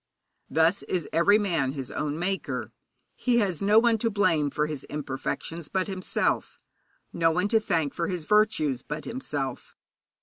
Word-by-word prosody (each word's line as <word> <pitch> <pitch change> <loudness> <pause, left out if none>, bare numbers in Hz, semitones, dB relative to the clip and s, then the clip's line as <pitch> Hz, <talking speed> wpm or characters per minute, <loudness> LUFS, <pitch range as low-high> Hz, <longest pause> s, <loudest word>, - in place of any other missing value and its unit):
Thus 160 +5 +3
is 180 -5 -2
every 170 +6 +5
man 165 -11 0
his 135 -4 -6
own 150 0 -2
maker. 190 +3 -3 0.4
He 245 -2 +1
has 195 -8 +1
no 205 +2 +4
one 230 -1 +4
to 230 - +1
blame 165 -8 +2
for 150 +2 0
his 150 -3 -5
imperfections 150 +3 -4
but 185 -1 0
himself, 190 -2 -1 0.6
no 165 -1 +3
one 180 +5 0
to 225 0 +4
thank 160 -9 0
for 170 - -2
his 175 -4 -3
virtues 155 - +2
but 150 +2 -6
himself. 145 - -4
170 Hz, 160 wpm, -27 LUFS, 150-205 Hz, 0.6 s, every